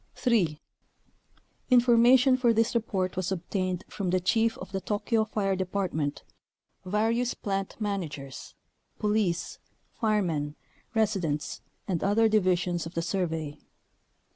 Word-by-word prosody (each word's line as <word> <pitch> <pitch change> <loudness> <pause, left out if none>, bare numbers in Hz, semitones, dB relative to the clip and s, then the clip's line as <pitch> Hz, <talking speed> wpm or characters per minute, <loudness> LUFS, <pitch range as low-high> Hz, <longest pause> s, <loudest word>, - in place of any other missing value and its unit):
3. 185 - +1 1.1
Information 250 +1 +6
for 245 -2 +3
this 225 +1 +2
report 195 -6 -1
was 185 0 -2
obtained 185 0 -2
from 195 -3 -3
the 185 +1 +2
chief 225 +5 +1
of 185 - -9
the 195 -1 -3
Tokyo 220 +3 0
fire 200 -3 0
department, 180 -6 -2 0.6
various 225 +5 0
plant 195 -1 -3
managers, 160 - -5 0.4
police, 210 -5 0 0.3
firemen, 170 -10 0 0.4
resi 215 -3 +2
dents, 150 -2 -3 0.3
and 180 -5 -1
other 215 +3 +4
divisions 180 -5 +1
of 165 - -11
the 165 - 0
Survey. 160 -5 -2
195 Hz, 115 wpm, -28 LUFS, 175-220 Hz, 1.1 s, Information